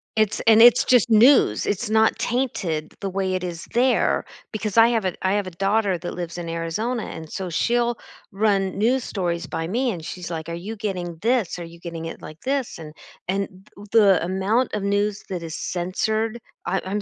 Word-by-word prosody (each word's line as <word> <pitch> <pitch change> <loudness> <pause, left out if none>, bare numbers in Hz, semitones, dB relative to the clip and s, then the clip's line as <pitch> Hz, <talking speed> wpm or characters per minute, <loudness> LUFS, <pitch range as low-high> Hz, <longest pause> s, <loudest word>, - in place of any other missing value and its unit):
It's 215 -2 +1
and 225 -1 +6
it's 240 0 +8
just 245 -2 +4
news, 225 - +5
it's 210 +2 -1
not 220 0 +3
tainted 190 -11 -2
the 195 - -2
way 190 0 -1
it 185 -1 -2
is 170 -2 -5
there 250 +2 +2 0.3
because 215 -1 -3
I 230 +1 +8
have 225 -5 0
a 180 - -1
I 190 - +3
have 205 -2 0
a - - -6
daughter 195 +1 +1
that 175 - -6
lives 175 -1 -5
in 170 -1 -5
Arizona, 180 +9 -2
and 160 - -8
so 185 -2 -4
she'll 240 +6 +1 0.3
run 195 -2 +1
news 240 +4 +2
stories 175 -3 -2
by 165 0 -3
me, 245 +7 0
and 165 -6 -6
she's 180 0 -6
like, 165 -1 -5
"Are - - -4
you 195 +7 -6
getting 180 -6 -4
this? 235 -7 +1
Are 175 - -6
you 170 0 -12
getting 165 -1 -6
it 165 - -7
like 155 +1 -10
this 270 -2 -2
and" 155 -2 -10 0.3
And 195 +1 0 0.3
th 205 +1 -13
the 200 -6 +5
amount 195 +7 0
of 205 - -3
news 205 +1 0
that 180 -3 -3
is 165 -1 -6
censored 215 +6 -2 0.3
I 190 +2 +1
I'm 200 +2 -2
195 Hz, 205 wpm, -23 LUFS, 175-225 Hz, 0.3 s, it's